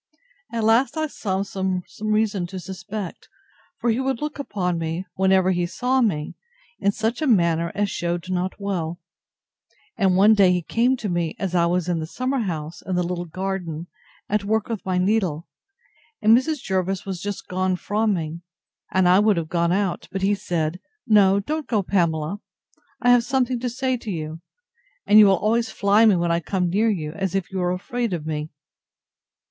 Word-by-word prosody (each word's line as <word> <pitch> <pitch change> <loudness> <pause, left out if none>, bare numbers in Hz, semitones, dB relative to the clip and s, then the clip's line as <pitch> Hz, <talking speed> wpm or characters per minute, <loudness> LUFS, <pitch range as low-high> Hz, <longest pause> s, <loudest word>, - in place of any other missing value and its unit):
At 230 -1 -2
last, 230 +8 +3
I 315 - +1
saw 195 -9 -2
some 190 -2 -2 0.2
reason 215 -3 +1
to 190 +1 -6
suspect; 190 +1 -7 0.5
for 240 - +1
he 225 - 0
would 265 -2 -1
look 300 -1 -4
upon 180 -10 -2
me, 165 +3 -3
whenever 190 0 +3
he 175 -1 0
saw 255 +7 0
me, 160 -11 0 0.5
in 200 - +2
such 225 +6 -2
a 310 - +1
manner, 170 -7 +2
as 205 -1 0
shewed 175 0 -2
not 185 +2 -2
well; 175 -4 -3 1.0
and 190 -3 +2
one 205 +3 +7
day 195 -4 +5
he 180 -1 0
came 245 +8 +1
to 225 - -4
me, 175 -3 -1
as 190 -2 -3
I 170 -1 +3
was 175 0 0
in 175 -2 0
the 160 - -4
summer 255 +8 -2
house 165 -6 -4
in 185 - -3
the 180 - +1
little 175 0 -3
garden, 175 -2 -4 0.4
at 210 0 0
work 220 +2 0
with 225 -4 -3
my 185 -1 -1
needle, 180 -5 0 0.7
and 220 +1 +6
Mrs. 270 +3 0
Jervis 190 0 -1
was 190 -3 -5
just 205 -1 -5
gone 185 0 0
from 210 +3 0
me; 165 0 -4 0.5
and 190 -1 +3
I 180 +2 +6
would 210 -2 +3
have 160 -2 -2
gone 170 -1 +1
out, 190 -1 -1
but 190 0 -3
he 200 +1 +3
said, 175 -4 -2 0.3
No 200 -4 +5
don't 305 +9 -3
go, 215 -4 +1
Pamela; 170 -1 0 0.6
I 245 - +6
have 245 -1 +5
something 255 -1 0
to 250 +1 -2
say 260 +1 -1
to 230 - -8
you; 160 -3 -5 0.6
and 210 - +7
you 210 -2 +8
always 220 +4 +2
fly 205 +2 +4
me 205 - +5
when 170 -1 0
I 170 - +2
come 180 0 -1
near 215 +5 +2
you, 160 -8 -2
as 190 +2 -3
if 195 -1 -2
you 190 - -3
were 180 0 +1
afraid 235 +4 -2
of 160 -3 -4
me. 155 -1 -3
190 Hz, 190 wpm, -23 LUFS, 175-220 Hz, 1.0 s, you